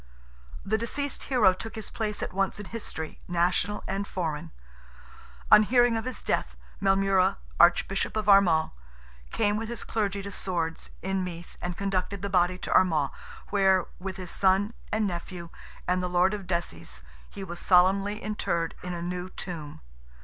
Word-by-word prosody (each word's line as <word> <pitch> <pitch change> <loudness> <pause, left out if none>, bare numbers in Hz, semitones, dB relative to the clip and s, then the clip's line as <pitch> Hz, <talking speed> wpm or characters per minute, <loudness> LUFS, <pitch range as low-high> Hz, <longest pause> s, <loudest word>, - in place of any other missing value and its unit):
The 220 +2 +1
deceased 280 +5 -3
hero 225 -8 +4
took 225 +4 -7
his 220 -2 -6
place 210 -2 -2
at - - -4
once 195 +1 0
in 205 - -6
history, 160 -8 -6
national 180 +3 +1
and 195 +1 -2
foreign. 165 -2 -3 1.0
On - - +10
hearing 240 +1 +4
of 225 - -2
his 255 -3 -4
death, - - -1 0.3
Maelmurra, 195 - +3 0.2
Archbishop - - +3
of 215 -1 -2
Armagh, 185 -6 +5 0.6
came 205 - +1
with 225 +1 -4
his 235 - -4
clergy 200 -3 -1
to 200 - -6
Swords, 170 -4 -2
in 190 0 0
Meath, 175 -1 -7
and 175 -1 -4
conducted 195 0 -2
the 200 - -2
body 180 0 +3
to - - -3
Armagh, 155 -7 +3 0.4
where, 190 -3 +4
with 190 0 -5
his 185 -2 -7
son 195 +3 +2 0.2
and 215 0 +1
nephew 175 -2 -5 0.4
and 180 0 +2
the 180 - -2
Lord 180 +2 +3
of 200 -3 -5
Desies, 85 - -3 0.3
he 195 - -8
was 175 -2 -6
solemnly 195 +4 +3
interred 170 -5 -1
"in 180 -1 -4
a 170 - -5
new 180 +1 -4
tomb." 160 -6 -6
190 Hz, 165 wpm, -28 LUFS, 175-205 Hz, 1.0 s, On